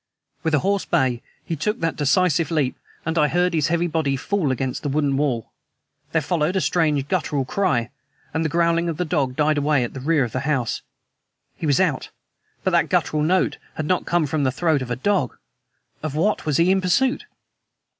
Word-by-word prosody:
With 160 Hz, -1 st, +1 dB
a -, -, +3 dB
hoarse 200 Hz, 0 st, +1 dB
bay 130 Hz, -8 st, +1 dB, 0.2 s
he 165 Hz, -, -2 dB
took 210 Hz, +8 st, -2 dB
that 165 Hz, -1 st, -1 dB
decisive 160 Hz, +2 st, +2 dB
leap, 150 Hz, -6 st, 0 dB, 0.3 s
and 165 Hz, +1 st, 0 dB
I 150 Hz, -, +4 dB
heard 180 Hz, +3 st, +1 dB
his 155 Hz, -3 st, +2 dB
heavy 170 Hz, +1 st, +1 dB
body 155 Hz, -5 st, 0 dB
fall 190 Hz, +1 st, -1 dB
against 130 Hz, 0 st, -2 dB
the 145 Hz, -, -2 dB
wooden 140 Hz, -1 st, +1 dB
wall. 135 Hz, -6 st, -1 dB, 0.6 s
There 160 Hz, -1 st, +1 dB
followed 165 Hz, +2 st, 0 dB
a 190 Hz, -, +2 dB
strange, 150 Hz, -3 st, +1 dB
guttural 150 Hz, -6 st, -1 dB
cry... 125 Hz, -, 0 dB, 0.4 s
and 160 Hz, +1 st, 0 dB
the 160 Hz, -, 0 dB
growling 170 Hz, +1 st, +2 dB
of 160 Hz, -, -3 dB
the 180 Hz, -, -1 dB
dog 135 Hz, -5 st, 0 dB
died 150 Hz, +1 st, +2 dB
away 145 Hz, -2 st, +2 dB
at 120 Hz, -, -4 dB
the 135 Hz, -, -6 dB
rear 150 Hz, +1 st, +2 dB
of 120 Hz, -, -3 dB
the 130 Hz, -, -2 dB
house. 135 Hz, -4 st, -1 dB, 0.7 s
He 160 Hz, -, -4 dB
was 140 Hz, -3 st, +3 dB
out! -, -, 0 dB, 0.5 s
But -, -, +1 dB
that -, -, +2 dB
guttural 155 Hz, -, +1 dB
note 180 Hz, +4 st, +1 dB, 0.2 s
had 155 Hz, -, -3 dB
not 180 Hz, +3 st, 0 dB
come 170 Hz, -2 st, +2 dB
from 145 Hz, +1 st, -1 dB
the 130 Hz, -, +2 dB
throat 155 Hz, 0 st, +1 dB
of 130 Hz, -, -5 dB
a 125 Hz, -, -1 dB
dog. 145 Hz, 0 st, 0 dB, 0.6 s
Of 155 Hz, -2 st, -4 dB
what 185 Hz, +2 st, 0 dB
was 145 Hz, -3 st, +2 dB
he 170 Hz, +2 st, +4 dB
in 190 Hz, 0 st, +2 dB
pursuit? 260 Hz, -, +1 dB
155 Hz, 205 wpm, -22 LUFS, 140-170 Hz, 0.7 s, I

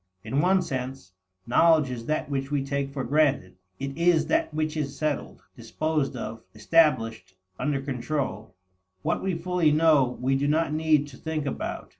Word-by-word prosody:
In 140 Hz, +2 st, 0 dB
one 185 Hz, +1 st, +3 dB
sense, 130 Hz, -, -5 dB, 0.3 s
knowledge 155 Hz, +2 st, +4 dB
is 115 Hz, -2 st, -6 dB
that 155 Hz, -, -1 dB
which 135 Hz, -1 st, -3 dB
we 145 Hz, -2 st, -1 dB
take 140 Hz, 0 st, -2 dB
for 135 Hz, -2 st, -4 dB
granted. 135 Hz, -9 st, +1 dB, 0.2 s
It 135 Hz, 0 st, -5 dB
is 170 Hz, -1 st, +3 dB
that 325 Hz, +1 st, +1 dB
which 155 Hz, 0 st, -2 dB
is 140 Hz, -3 st, -3 dB
settled, 155 Hz, -2 st, -3 dB
disposed 140 Hz, +5 st, -2 dB
of, 115 Hz, -2 st, -6 dB
established, 115 Hz, -, +2 dB, 0.2 s
under 145 Hz, -2 st, 0 dB
control. 130 Hz, -6 st, -4 dB, 0.5 s
What -, -, 0 dB
we 190 Hz, -2 st, -1 dB
fully 170 Hz, -2 st, +1 dB
know, 150 Hz, -5 st, +3 dB
we 130 Hz, +2 st, +1 dB
do 140 Hz, +1 st, 0 dB
not 155 Hz, +1 st, +1 dB
need 155 Hz, -2 st, +2 dB
to 130 Hz, -, -13 dB
think 160 Hz, -2 st, -3 dB
about. 140 Hz, -, -4 dB
145 Hz, 165 wpm, -26 LUFS, 130-155 Hz, 0.5 s, knowledge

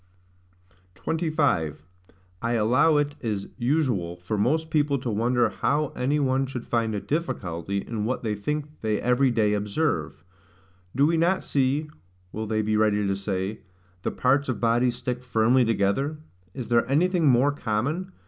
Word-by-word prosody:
25. 145 Hz, -, 0 dB, 0.6 s
I 115 Hz, +1 st, 0 dB
allow 125 Hz, +8 st, +3 dB
it 145 Hz, 0 st, 0 dB
is 105 Hz, -4 st, -3 dB
usual 120 Hz, -, 0 dB
for 90 Hz, +4 st, -4 dB
most 155 Hz, +10 st, 0 dB
people 145 Hz, -2 st, +2 dB
to 125 Hz, -2 st, -3 dB
wonder 120 Hz, +2 st, +2 dB
how 145 Hz, +5 st, 0 dB
any 140 Hz, +4 st, 0 dB
one 135 Hz, -1 st, +1 dB
should 125 Hz, -2 st, -6 dB
find 115 Hz, -2 st, 0 dB
a -, -, -1 dB
difficulty 100 Hz, -, -3 dB
in 110 Hz, -3 st, -3 dB
what 125 Hz, +4 st, -2 dB
they 110 Hz, -2 st, -1 dB
think 150 Hz, +8 st, -4 dB
they 110 Hz, -2 st, 0 dB
every 125 Hz, +2 st, +3 dB
day 110 Hz, -3 st, +2 dB
observe. 100 Hz, -, -1 dB, 0.7 s
Do 140 Hz, +3 st, +4 dB
we 165 Hz, +2 st, +2 dB
not 175 Hz, +4 st, +2 dB
see 140 Hz, +3 st, 0 dB, 0.4 s
(will 110 Hz, 0 st, -4 dB
they 110 Hz, 0 st, 0 dB
be 110 Hz, 0 st, 0 dB
ready 105 Hz, -1 st, +2 dB
to 100 Hz, 0 st, 0 dB
say) 100 Hz, +1 st, -3 dB, 0.4 s
the -, -, -1 dB
parts 135 Hz, +2 st, +1 dB
of 130 Hz, -, -2 dB
bodies 120 Hz, +1 st, +2 dB
stick 125 Hz, 0 st, -4 dB
firmly 120 Hz, +1 st, +3 dB
together? 115 Hz, +7 st, 0 dB, 0.4 s
Is 125 Hz, -3 st, -6 dB
there 120 Hz, 0 st, +2 dB
anything 170 Hz, +3 st, +2 dB
more 130 Hz, +2 st, +4 dB
common? 145 Hz, -, -2 dB
120 Hz, 160 wpm, -25 LUFS, 105-145 Hz, 0.7 s, Do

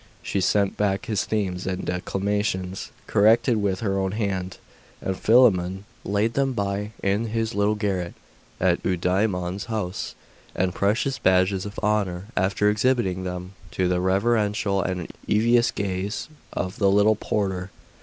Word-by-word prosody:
She 95 Hz, -, -1 dB
sent 100 Hz, +1 st, +2 dB
back 105 Hz, +2 st, 0 dB
his 110 Hz, -5 st, -1 dB
themes 95 Hz, -4 st, -2 dB
and 95 Hz, -1 st, -2 dB
declamations, 95 Hz, 0 st, -2 dB, 0.2 s
corrected 110 Hz, +2 st, +4 dB
with 95 Hz, -2 st, 0 dB
her 100 Hz, -3 st, 0 dB
own 95 Hz, 0 st, -1 dB
hand; 95 Hz, -4 st, -2 dB, 0.4 s
and 95 Hz, -, -2 dB
Philammon 95 Hz, -5 st, +3 dB, 0.2 s
laid 105 Hz, +3 st, 0 dB
them 135 Hz, -1 st, +1 dB
by 100 Hz, -1 st, -2 dB
in 100 Hz, +4 st, +1 dB
his 115 Hz, +1 st, -1 dB
little 100 Hz, +1 st, +2 dB
garret 95 Hz, -4 st, -2 dB, 0.4 s
at -, -, +2 dB
Eudaimon's 90 Hz, +1 st, 0 dB
house 105 Hz, -5 st, -3 dB, 0.4 s
as 95 Hz, 0 st, +1 dB
precious 110 Hz, +9 st, 0 dB
badges 95 Hz, +1 st, +2 dB
of 100 Hz, -, -10 dB
honour, 100 Hz, -4 st, 0 dB
after 100 Hz, +2 st, +2 dB
exhibiting 105 Hz, -4 st, +1 dB
them 90 Hz, 0 st, -5 dB, 0.2 s
to 95 Hz, -, 0 dB
the 90 Hz, 0 st, +1 dB
reverential 100 Hz, +1 st, +1 dB
and 90 Hz, -1 st, -3 dB, 0.2 s
envious 120 Hz, +3 st, +4 dB
gaze 100 Hz, +3 st, -3 dB, 0.2 s
of 90 Hz, +1 st, -3 dB
the 100 Hz, -2 st, +4 dB
little 105 Hz, +2 st, +4 dB
porter. 95 Hz, -3 st, -2 dB
100 Hz, 140 wpm, -24 LUFS, 95-105 Hz, 0.4 s, corrected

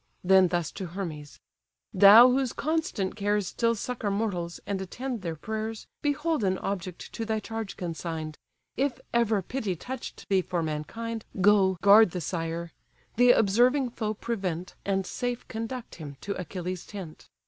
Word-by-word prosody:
Then 190 Hz, 0 st, +6 dB
thus 175 Hz, -2 st, -1 dB
to 190 Hz, -, -6 dB
Hermes: 165 Hz, -5 st, -6 dB, 0.5 s
"Thou 210 Hz, +6 st, +9 dB
whose 260 Hz, -1 st, +1 dB
constant 310 Hz, -, -1 dB
cares 205 Hz, -1 st, 0 dB
Still 230 Hz, +5 st, 0 dB
succour 230 Hz, -1 st, -3 dB
mortals, 195 Hz, -5 st, -2 dB
and 200 Hz, -1 st, -2 dB
attend 240 Hz, +5 st, -5 dB
their 165 Hz, -3 st, -3 dB
prayers; 220 Hz, +5 st, -4 dB, 0.2 s
Behold 295 Hz, -1 st, 0 dB
an 190 Hz, -1 st, +1 dB
object 185 Hz, -3 st, -5 dB
to 230 Hz, -, -3 dB
thy 220 Hz, -1 st, -1 dB
charge 225 Hz, -1 st, -6 dB
consign'd: 160 Hz, -3 st, -4 dB, 0.4 s
If 265 Hz, -2 st, 0 dB
ever 225 Hz, -4 st, +2 dB
pity 215 Hz, -4 st, -3 dB
touch'd 250 Hz, +8 st, -7 dB
thee 195 Hz, -2 st, +3 dB
for 175 Hz, -2 st, -2 dB
mankind, 220 Hz, +10 st, -4 dB, 0.2 s
Go, 190 Hz, -1 st, +4 dB
guard 205 Hz, +1 st, +8 dB
the -, -, -3 dB
sire: 165 Hz, 0 st, -3 dB, 0.5 s
the 245 Hz, +1 st, +6 dB
observing 245 Hz, +4 st, +4 dB
foe 215 Hz, -2 st, -3 dB
prevent, 185 Hz, -6 st, -3 dB
And 195 Hz, -1 st, 0 dB
safe 245 Hz, +4 st, -3 dB
conduct 230 Hz, +2 st, -5 dB
him 145 Hz, -2 st, -8 dB
to 200 Hz, -, -3 dB
Achilles' 180 Hz, -1 st, -5 dB
tent." 190 Hz, -7 st, -9 dB
200 Hz, 150 wpm, -28 LUFS, 180-230 Hz, 0.5 s, Thou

